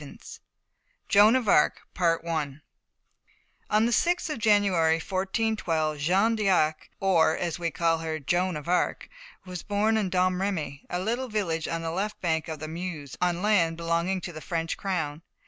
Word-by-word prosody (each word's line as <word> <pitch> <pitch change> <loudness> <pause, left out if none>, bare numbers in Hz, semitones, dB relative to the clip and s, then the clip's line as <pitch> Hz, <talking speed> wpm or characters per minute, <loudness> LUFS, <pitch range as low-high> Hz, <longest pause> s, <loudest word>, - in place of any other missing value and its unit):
V 140 - -11 0.9
JOAN 210 +4 +6
OF 255 -4 0
ARC 150 - +3 0.5
On 155 -3 -3 1.1
the 220 +3 +3
6th 350 +4 +1
of 300 - -4
January, 200 -7 +3
1412, 185 -4 -1
Jeanne 195 +9 +2
d'Arc, 180 -7 +1
or, 175 -5 +3
as 175 -1 -3
we 170 -1 -1
call 165 +1 +1
her, 160 -1 -3
Joan 175 +4 0
of 150 - -9
Arc, 180 +1 0 0.4
was 180 -2 -6
born 215 +2 +1
at 205 -4 0
Domremy, 180 -5 -1
a 180 - -2
little 235 +7 -2
village 170 -7 -1
on 165 0 -3
the 165 - -2
left 200 +5 -3
bank 160 -2 -1
of 160 -1 -5
the 155 +1 -6
Meuse, 160 -4 -6
on 180 0 0
land 175 -6 +2
belonging 170 +3 -1
to 175 - -6
the 155 - -8
French 165 -1 -2
crown. 160 -6 -3
175 Hz, 160 wpm, -27 LUFS, 160-200 Hz, 1.1 s, JOAN